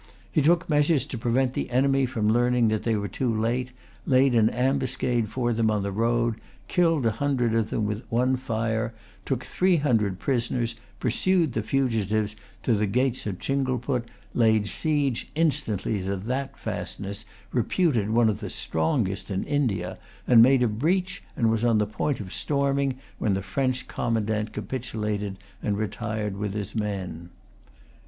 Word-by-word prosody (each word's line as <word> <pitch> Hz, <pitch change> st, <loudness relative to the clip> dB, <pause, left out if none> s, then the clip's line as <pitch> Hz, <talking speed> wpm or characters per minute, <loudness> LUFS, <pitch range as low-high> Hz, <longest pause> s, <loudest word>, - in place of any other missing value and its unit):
He 155 Hz, -, +3 dB
took 170 Hz, +3 st, +3 dB
measures 150 Hz, -2 st, +3 dB
to 125 Hz, -, -6 dB
prevent 125 Hz, +3 st, +1 dB
the -, -, -2 dB
enemy 135 Hz, +1 st, +3 dB
from 110 Hz, -4 st, -1 dB
learning 120 Hz, +1 st, +3 dB
that 110 Hz, -1 st, 0 dB
they 115 Hz, -1 st, +1 dB
were 100 Hz, -1 st, -2 dB
too 120 Hz, +6 st, -1 dB
late, 120 Hz, +3 st, -1 dB, 0.4 s
laid 130 Hz, 0 st, +4 dB
an 110 Hz, -2 st, +5 dB
ambuscade 125 Hz, -3 st, 0 dB
for 120 Hz, +1 st, 0 dB
them 110 Hz, -1 st, +2 dB
on 105 Hz, -2 st, 0 dB
the 100 Hz, -, -2 dB
road, 115 Hz, +2 st, +1 dB, 0.3 s
killed 165 Hz, -7 st, +2 dB
a 115 Hz, -, +4 dB
hundred 125 Hz, -1 st, 0 dB
of 115 Hz, -1 st, +1 dB
them 110 Hz, -, -1 dB
with 105 Hz, +1 st, -2 dB
one 125 Hz, +3 st, +2 dB
fire, 115 Hz, -2 st, -2 dB, 0.3 s
took -, -, -1 dB
three 185 Hz, 0 st, +2 dB
hundred 115 Hz, -, +1 dB
prisoners, 120 Hz, -1 st, 0 dB, 0.3 s
pursued 160 Hz, +4 st, +2 dB
the 110 Hz, -, 0 dB
fugitives 110 Hz, -4 st, 0 dB, 0.3 s
to 120 Hz, -, +2 dB
the 105 Hz, 0 st, +1 dB
gates 125 Hz, +3 st, 0 dB
of 95 Hz, -3 st, -3 dB
Chingleput, 130 Hz, -1 st, -1 dB, 0.3 s
laid 110 Hz, -3 st, +3 dB
siege 145 Hz, -2 st, 0 dB
instantly 135 Hz, -, 0 dB
to 95 Hz, +2 st, -2 dB
that 125 Hz, +8 st, -3 dB
fastness, 100 Hz, +2 st, -4 dB, 0.3 s
reputed 125 Hz, -, +1 dB
one 115 Hz, +1 st, +4 dB
of 105 Hz, -1 st, 0 dB
the -, -, -5 dB
strongest 95 Hz, +6 st, -1 dB
in 95 Hz, -1 st, -1 dB
India, 110 Hz, -12 st, -1 dB, 0.3 s
made 125 Hz, +2 st, +7 dB
a -, -, +4 dB
breach, 175 Hz, -, 0 dB, 0.2 s
and 115 Hz, -2 st, +3 dB
was 115 Hz, 0 st, 0 dB
on 115 Hz, -2 st, +4 dB
the 105 Hz, -, +2 dB
point 115 Hz, +6 st, -2 dB
of 95 Hz, -3 st, -7 dB
storming, 140 Hz, -2 st, 0 dB, 0.2 s
when 100 Hz, -3 st, +1 dB
the 95 Hz, -, -3 dB
French 130 Hz, +5 st, -1 dB
commandant 110 Hz, -2 st, -1 dB
capitulated 105 Hz, -5 st, -3 dB, 0.2 s
and 105 Hz, -1 st, -1 dB
retired 105 Hz, -1 st, -3 dB
with 100 Hz, 0 st, -3 dB
his 105 Hz, -1 st, -3 dB
men. 95 Hz, -6 st, -4 dB
115 Hz, 160 wpm, -26 LUFS, 105-130 Hz, 0.4 s, made